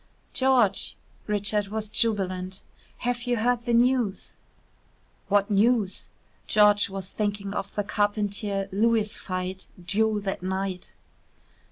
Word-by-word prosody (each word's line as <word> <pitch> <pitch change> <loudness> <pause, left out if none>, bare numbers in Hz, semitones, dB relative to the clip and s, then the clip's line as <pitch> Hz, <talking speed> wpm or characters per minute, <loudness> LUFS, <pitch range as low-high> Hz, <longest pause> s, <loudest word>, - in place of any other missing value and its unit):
"George!" 255 -7 +2 0.3
Richard 205 0 0
was 215 +1 -3
jubilant. 190 -5 0 0.4
"Have 245 0 -1
you 245 -1 +1
heard 240 +1 +1
the 240 - 0
news?" 240 -4 +1 0.9
"What 205 +1 +2
news?" 210 -1 +2 0.4
George 210 -1 +4
was 190 -1 -5
thinking 205 -1 -2
of 200 -1 -4
the 205 - 0
Carpentier 205 -1 -1
Lewis 215 +1 +1
fight 185 0 -4 0.2
due 215 +3 +1
that 195 -2 -3
night. 190 0 -3
205 Hz, 115 wpm, -26 LUFS, 195-220 Hz, 0.9 s, George